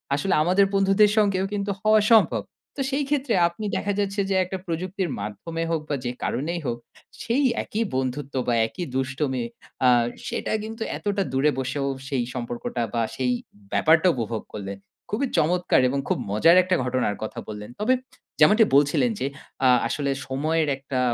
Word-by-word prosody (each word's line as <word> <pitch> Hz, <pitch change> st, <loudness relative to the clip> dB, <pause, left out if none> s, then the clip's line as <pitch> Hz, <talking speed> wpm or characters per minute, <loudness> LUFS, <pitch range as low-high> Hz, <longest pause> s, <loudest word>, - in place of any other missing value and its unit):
আসলে 185 Hz, +7 st, 0 dB
আমাদের 185 Hz, +3 st, +4 dB
বন্ধুদের 195 Hz, +2 st, +4 dB
সঙ্গেও 195 Hz, -3 st, +3 dB
কিন্তু 200 Hz, 0 st, -1 dB
হওয়া 215 Hz, 0 st, +5 dB
সম্ভব। 220 Hz, -, +4 dB, 0.3 s
তো 275 Hz, -, -3 dB
সেই 285 Hz, +2 st, 0 dB
ক্ষেত্রে 280 Hz, -4 st, 0 dB
আপনি 190 Hz, +5 st, -6 dB
দেখা 205 Hz, 0 st, -1 dB
যাচ্ছে 200 Hz, 0 st, 0 dB
যে, 195 Hz, -, +1 dB
একটা 185 Hz, +1 st, -4 dB
প্রযুক্তির 180 Hz, +2 st, -2 dB
মাধ্যমে 135 Hz, +12 st, -4 dB
হোক 160 Hz, -2 st, 0 dB
বা 145 Hz, -, +1 dB
যে 120 Hz, -, 0 dB
কারণেই 170 Hz, +6 st, -2 dB
হোক 120 Hz, -1 st, -1 dB, 0.5 s
সেই 255 Hz, +5 st, +1 dB, 0.2 s
একই 225 Hz, +2 st, -2 dB
বন্ধুত্ব 130 Hz, +2 st, -2 dB
বা 120 Hz, -, +2 dB
একই 175 Hz, +8 st, -6 dB
দুষ্টমি 130 Hz, -1 st, -1 dB, 0.4 s
আ -, -, +7 dB, 0.4 s
সেটা -, -, -3 dB
কিন্তু 225 Hz, +1 st, -5 dB
এতটা 200 Hz, -1 st, -1 dB
দূরে 145 Hz, +3 st, +3 dB
বসেও, 140 Hz, +2 st, -2 dB, 0.2 s
সেই 130 Hz, -3 st, 0 dB
সম্পর্কটা 120 Hz, 0 st, -4 dB
বা 115 Hz, -, +1 dB
সেই 125 Hz, -1 st, 0 dB, 0.4 s
ব্যাপারটা 160 Hz, -, +4 dB
উপভোগ 115 Hz, -2 st, -3 dB
করলেন। 100 Hz, -1 st, -5 dB, 0.3 s
খুবই 255 Hz, +6 st, 0 dB
চমৎকার 175 Hz, -1 st, +3 dB
এবং 140 Hz, +1 st, -1 dB
খুব -, -, +2 dB
মজার 165 Hz, -, +5 dB
একটা 185 Hz, 0 st, +1 dB
ঘটনার 125 Hz, -5 st, 0 dB
কথা 110 Hz, -, -5 dB
বললেন। 105 Hz, 0 st, -7 dB
তবে 240 Hz, +5 st, +3 dB, 0.5 s
যেমনটি 210 Hz, +8 st, +6 dB
বলছিলেন 145 Hz, -, +3 dB
যে, -, -, -1 dB, 0.4 s
আ -, -, +7 dB, 0.2 s
আসলে 140 Hz, -2 st, -1 dB, 0.2 s
সময়ের 155 Hz, +4 st, 0 dB
একটা 135 Hz, -1 st, -4 dB
160 Hz, 165 wpm, -24 LUFS, 130-200 Hz, 0.5 s, আ